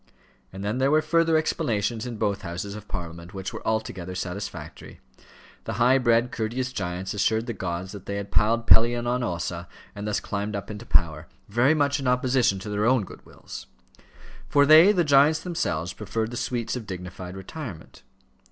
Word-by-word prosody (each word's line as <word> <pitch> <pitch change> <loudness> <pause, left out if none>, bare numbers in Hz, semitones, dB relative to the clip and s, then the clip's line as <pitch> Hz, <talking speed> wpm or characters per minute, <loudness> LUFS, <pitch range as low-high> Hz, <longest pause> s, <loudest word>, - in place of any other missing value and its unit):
And 95 +1 -7
then 105 +5 -1
there 135 +1 +3
were 155 +1 +3
further 165 0 +3
explanations 120 - -1
in 120 -2 -5
both 100 -2 0
Houses 90 +2 -5
of 105 0 -9
Parliament, 85 0 -7
which 95 0 -5
were - - -6
altogether 95 -5 -2
satisfactory. 90 -4 -6 0.7
The - - -3
high 125 +3 +4
bred, 120 0 +3
courteous 125 +3 -2
giants 90 0 -3
assured 110 +2 +1
the 120 - -3
gods 90 -1 -4
that 100 -3 -10
they 100 - -3
had 100 0 -5
piled 115 +3 +2
Pelion 120 +1 +5
on 125 +1 0
Ossa 85 -4 -3 0.3
and 105 +1 -6
thus 105 - 0
climbed 100 +1 -3
up 100 +2 -5
into 105 +3 -8
power, 80 -2 +1 0.2
very 120 +9 +3
much 145 -1 +2
in 135 - -3
opposition 125 -3 +2
to 105 - -6
their 105 +1 +1
own 125 -3 +3
good - - -12
wills; - - -10 0.8
for 145 -1 +5
they, 160 +6 +8
the 180 -4 +2
giants 145 +1 +5
themselves, 90 - -2
preferred 110 +2 -3
the - - -5
sweets 120 -1 -2
of 115 -4 -6
dignified 90 0 -7
retirement. 100 - -8
110 Hz, 180 wpm, -25 LUFS, 95-125 Hz, 0.8 s, they